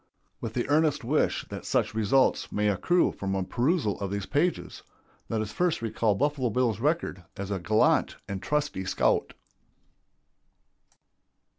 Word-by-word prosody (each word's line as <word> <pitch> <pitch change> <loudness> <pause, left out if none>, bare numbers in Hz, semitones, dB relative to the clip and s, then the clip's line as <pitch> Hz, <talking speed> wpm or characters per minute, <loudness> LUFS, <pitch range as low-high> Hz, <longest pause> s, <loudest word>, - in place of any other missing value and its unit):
With 115 -1 -6
the 120 - -1
earnest 150 -2 +2
wish 145 +6 +1
that - - -6
such - - 0
results 110 +5 +2
may 105 0 +1
accrue 175 - +2
from 95 -1 -3
a 95 - 0
perusal 125 - 0
of 100 - -3
these 100 0 -3
pages, 165 - -1 0.5
let 110 -1 0
us 105 -1 -4
first 175 -8 0
recall 110 -2 +1
Buffalo 140 +1 0
Bill's 115 -1 0
record 145 - -1
as 100 0 -5
a 100 - -1
gallant 110 +5 +2
and 100 -1 -4
trusty 150 -9 -1
scout. 95 - +1
115 Hz, 145 wpm, -27 LUFS, 100-145 Hz, 0.5 s, earnest